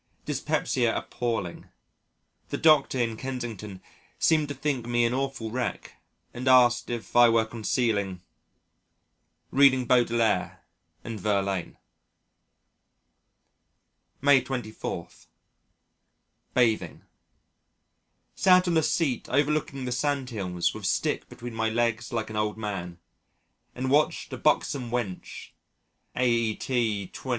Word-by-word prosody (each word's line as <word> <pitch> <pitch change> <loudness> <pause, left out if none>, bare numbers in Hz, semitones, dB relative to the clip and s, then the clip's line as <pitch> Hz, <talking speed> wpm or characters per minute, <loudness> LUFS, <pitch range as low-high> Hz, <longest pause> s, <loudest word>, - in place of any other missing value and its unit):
Dyspepsia - - 0
appalling. 115 -8 -4 0.8
The - - -2
Doctor 155 -4 +4
in 115 -3 -1
Kensington 110 -7 -6 0.3
seemed 155 -2 +3
to 145 - -5
think 130 -4 -2
me 120 0 +2
an 115 - 0
awful 135 -4 -3
wreck 125 0 -4 0.3
and 125 +2 -5
asked 120 -2 +5
if 120 -1 -5
I 120 -1 +8
were 115 -1 +3
concealing 110 -5 -1 1.3
Reading 130 -2 +5
Baudelaire 115 -5 +1 0.4
and 115 -2 -6
Verlaine. 100 -3 -1 2.4
May 140 -1 +6
24. 120 -4 -5 1.5
Bathing 115 -4 +1 1.3
Sat 185 -1 +4
on 170 -2 +2
a - - +4
seat 145 -6 0
overlooking 140 -1 0
the 125 - -3
sand 135 0 -1
hills 90 -5 -1
with - - -4
stick - - -1
between 120 0 -8
my 110 0 0
legs 115 +1 -1
like - - -3
an - - -6
old 105 0 -1
man, 95 -5 -5 0.8
and 130 +1 -2
watched 150 +2 +1
a - - -4
buxom 125 -4 +1
wench 115 -6 -5 0.6
aet. 115 -3 0
120 Hz, 105 wpm, -27 LUFS, 110-130 Hz, 2.4 s, I